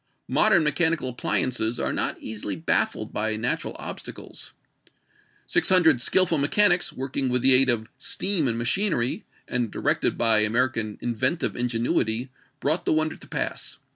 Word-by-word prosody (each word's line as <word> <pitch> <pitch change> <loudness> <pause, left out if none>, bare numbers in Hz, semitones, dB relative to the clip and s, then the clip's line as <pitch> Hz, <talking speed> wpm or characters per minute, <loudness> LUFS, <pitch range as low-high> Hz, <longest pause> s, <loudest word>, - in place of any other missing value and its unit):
Modern 170 -4 +3
mechanical 155 -1 +1
appliances 120 -1 -1
are - - -2
not - - -2
easily 105 -3 -5
baffled 80 -1 -1
by 110 0 -1
natural 115 +4 -3
obstacles. - - -8 0.9
Six - - +1
hundred 160 -9 +5
skillful 170 +1 +3
mechanics 175 +5 +3
working 135 0 -3
with 125 0 -1
the 135 - +8
aid 130 +1 +6
of 110 -2 +2
steam 175 +1 0
and 115 -1 -1
machinery, 125 - 0 0.2
and 120 -2 -2
directed - - -1
by 115 -2 +3
American 110 0 0
inventive 130 +7 -1
ingenuity, 120 0 -1 0.3
brought 155 +5 -1
the - - +2
wonder 155 0 0
to - - -14
pass. - - -4
125 Hz, 140 wpm, -24 LUFS, 115-155 Hz, 0.9 s, the